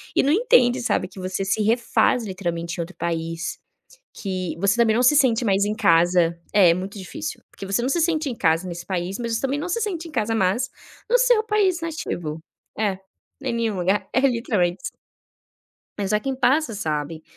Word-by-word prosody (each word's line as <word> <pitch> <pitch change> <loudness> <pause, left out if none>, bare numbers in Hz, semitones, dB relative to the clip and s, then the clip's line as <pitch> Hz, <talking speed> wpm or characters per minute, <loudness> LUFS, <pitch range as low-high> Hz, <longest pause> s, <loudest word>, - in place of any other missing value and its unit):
e - - +4
não 280 - +2
entende, 255 - +4
sabe, 185 -6 0
que 190 - -12
você 185 +1 -3
se 195 +3 0
refaz 235 +2 +2
literalmente 170 -4 -4
em - - +1
outro 170 +3 -7
país, 165 0 -3 0.5
que 185 -3 -4
você 200 +4 +2
também 230 -2 +3
não 245 - +3
se 255 +4 +5
sente 250 -4 +3
mais 200 -2 +2
em 210 +1 -1
casa 170 -2 +3
é 185 -5 +6
muito 190 +3 -6
difícil, 140 - -6
porque - - -10
você 195 +4 0
não 250 - 0
se 310 +5 +1
sente 315 -2 +1
em 250 - -3
casa 165 +1 +1
nesse 170 -1 -6
país, 185 +1 -3
mas 230 -2 -2
também 275 +1 -1
não 345 - -4
se 410 +6 -1
sente 350 -6 -3
em - - -11
casa 225 -5 -1
mais 220 +5 +1 0.4
no 485 - +5
seu - - +4
país 410 -5 +1
nativo. 175 - -4 0.4
É. 205 -3 0 0.4
Em 260 -3 -2
nenhum 230 -3 -1
lugar. 185 +3 0
É 260 - +3
literalmente 230 -9 +1
isso. - - -6 1.0
Mas 200 0 -2
é 210 - +3
quem 270 +4 -3
passa, 260 -1 +2
sabe. 155 -3 -3
210 Hz, 195 wpm, -23 LUFS, 180-260 Hz, 1.0 s, é